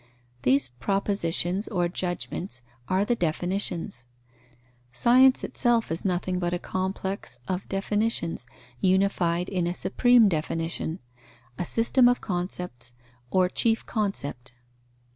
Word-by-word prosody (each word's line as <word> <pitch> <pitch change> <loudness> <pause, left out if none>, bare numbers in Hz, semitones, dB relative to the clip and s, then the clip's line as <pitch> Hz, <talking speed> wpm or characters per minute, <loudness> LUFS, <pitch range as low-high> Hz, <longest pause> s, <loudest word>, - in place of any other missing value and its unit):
These 130 +1 +3
propositions 180 - -1
or 175 -4 0
judgments 175 -5 -3 0.3
are 190 +2 +2
the 240 - +1
definitions. 175 - -2 0.8
Science 255 - +5
itself 235 -5 +1
is 165 - -1
nothing 180 -1 -1
but 175 0 0
a - - -1
complex 190 -6 -3
of 185 0 -3
definitions, 195 - -1 0.3
unified 185 -1 +2
in 180 -3 -1
a 175 - -2
supreme 245 +3 +4
definition; 165 -1 -2 0.6
a 180 - -1
system 235 +5 +3
of 245 - +1
concepts, 175 - -4 0.4
or 185 +4 +3
chief 225 +4 +1
concept. 145 - -3
180 Hz, 110 wpm, -26 LUFS, 165-200 Hz, 0.8 s, Science